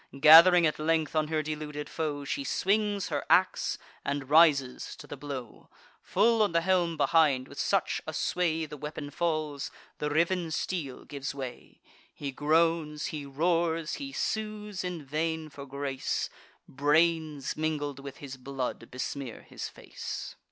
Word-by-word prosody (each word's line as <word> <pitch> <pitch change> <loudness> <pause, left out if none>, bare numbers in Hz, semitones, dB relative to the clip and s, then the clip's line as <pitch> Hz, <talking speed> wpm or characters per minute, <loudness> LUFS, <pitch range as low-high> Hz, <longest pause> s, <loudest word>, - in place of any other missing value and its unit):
Gath'ring 165 +4 +9
at 155 - 0
length 160 0 +1
on 155 -1 +2
her 155 0 0
deluded 150 -1 -5
foe, 150 -3 -3
She 280 - -2
swings 205 -4 +1
her - - -1
ax, - - +3 0.3
and 140 -1 -3
rises 150 -5 +4
to - - -11
the - - -7
blow 135 -5 -8 0.3
Full 225 +3 +3
on 205 -5 +2
the 170 - +3
helm 175 -2 +1
behind, 145 -4 +3
with - - -10
such - - +1
a - - -2
sway 165 -3 0
The 150 - -9
weapon 150 0 -6
falls, 155 -3 -1 0.3
the 150 - -1
riven 170 +3 +1
steel 160 -4 -3
gives 140 -1 -5
way: 130 -3 -8 0.3
He 140 -1 -4
groans, 155 +1 +1
he 145 -2 -5
roars, 165 +2 0
he 275 -1 -5
sues 210 -5 -3
in 175 -5 -4
vain 160 +2 -2
for 140 -1 -9
grace; 135 -1 -2 0.4
Brains, 150 0 +1
mingled 150 -3 -2
with 140 -1 -8
his 135 -2 -8
blood, 130 0 -4
besmear 130 -1 -5
his - - -6
face. - - -7
155 Hz, 150 wpm, -29 LUFS, 140-170 Hz, 0.4 s, Gath'ring